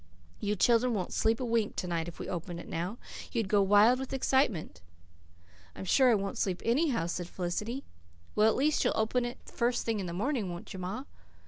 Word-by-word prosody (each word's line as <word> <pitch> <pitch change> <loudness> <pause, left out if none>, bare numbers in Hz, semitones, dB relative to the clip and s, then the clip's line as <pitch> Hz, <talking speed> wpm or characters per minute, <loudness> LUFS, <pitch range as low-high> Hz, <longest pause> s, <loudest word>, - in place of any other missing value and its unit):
You 210 0 0
children 235 +3 +3
wouldn't 185 -3 -3
sleep 225 +1 +2
a 255 - -2
wink 230 -3 0
to - - -2
night 170 -1 -1
if 175 - -8
we - - -6
opened 175 -1 -4
it - - -9
now. 180 +7 -3 0.3
You'd 225 -4 -1
go 205 +1 +4
wild 205 +5 +5
with 265 0 -5
excitement." 260 - +1 0.9
"I'm - - -6
sure 260 +6 +5
I 235 - +5
won't 195 -1 -3
sleep 185 -2 0
anyhow," 245 - +2
said 175 0 -3
Felicity. 210 +9 -3 0.5
"Well, 210 +1 +4
at - - +1
least 295 +3 +2
you'll - - +1
open 235 +3 +1
it 240 - -7
the - - -14
first 240 0 0
thing 225 -2 0
in 190 - -3
the - - -4
morning, 215 +2 -1
won't 175 +5 -8
you, 190 - -6
ma?" 190 +8 -4
215 Hz, 215 wpm, -30 LUFS, 185-245 Hz, 0.9 s, wild